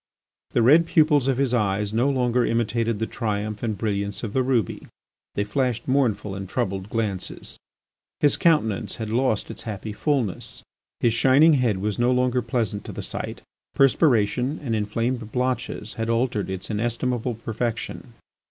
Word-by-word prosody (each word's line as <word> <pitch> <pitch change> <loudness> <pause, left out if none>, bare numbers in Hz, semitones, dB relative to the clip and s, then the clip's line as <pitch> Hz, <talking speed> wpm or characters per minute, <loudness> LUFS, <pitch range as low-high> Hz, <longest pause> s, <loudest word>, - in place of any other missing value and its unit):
The 120 - +3
red 155 +7 +6
pupils 150 -5 +4
of 135 -2 +2
his 135 -2 +1
eyes 105 -2 0
no 120 +5 +2
longer 125 -2 +2
imitated 115 -1 0
the 115 - -1
triumph 105 -3 -3
and 110 -3 -2
brilliance 100 -1 -2
of 105 -3 -4
the 130 - +2
ruby, 125 -7 0 0.5
they 100 - +1
flashed 120 +2 -1
mournful 125 -7 +1
and 95 -1 -6
troubled 95 +1 -2
glances. 105 -5 -4 0.6
His 145 - +4
countenance 110 - +1
had 110 -2 -5
lost 120 -3 0
its - - -7
happy 105 -1 -5
fulness. 125 - -2 0.4
His 115 - +3
shining 135 +7 +5
head 125 -8 +2
was 105 +3 -2
no 120 +1 +3
longer 125 0 +2
pleasant 115 -3 -2
to - - -6
the - - -6
sight; - - -5 0.3
perspiration 130 -1 +3
and 115 -5 -1
inflamed 115 +2 -2
blotches 125 -3 -2
bad 115 0 -1
altered 115 -4 0
its 95 +3 -5
inestimable 120 +2 -1
perfection. 115 +2 -4
115 Hz, 155 wpm, -24 LUFS, 105-125 Hz, 0.6 s, red